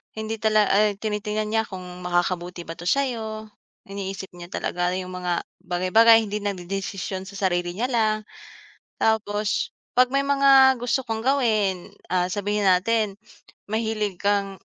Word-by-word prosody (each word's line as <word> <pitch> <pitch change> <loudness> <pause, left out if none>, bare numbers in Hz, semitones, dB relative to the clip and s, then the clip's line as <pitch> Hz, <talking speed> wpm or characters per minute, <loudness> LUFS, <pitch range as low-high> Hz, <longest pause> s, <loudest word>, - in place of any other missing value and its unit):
Hindi 220 0 -4
talaga 215 -1 +3
ay 210 -1 +3
tinitingnan 210 0 -3
niya 220 0 +2
kung 185 -2 -8 0.2
makakabuti 175 0 -1
ba 165 0 -8
to 175 - -6
sayo, 220 -5 -1 0.4
iniisip 195 -1 -5
niya 175 -1 -10
talaga 180 +1 -1
yung 185 0 -5
mga 180 -1 -2 0.2
bagay-bagay 220 +6 +5
hindi 210 0 -3
nag-dedesisyon 195 0 -4
sa 200 - -10
sarili 175 -2 -1
niya 250 +5 -1
lang. 220 -2 +2 0.8
Tapos 210 -1 0 0.2
pag 250 +1 +4
may 275 0 +2
mga 270 -1 +6
gusto 245 +2 0
kang 225 0 -3
gawin, 215 -9 +1 0.2
ah 180 -1 +2
sabihin 205 +1 -1
natin, 200 +3 +2 0.6
mahilig 215 -4 -1
kang, 200 -1 0
205 Hz, 140 wpm, -24 LUFS, 185-220 Hz, 0.8 s, mga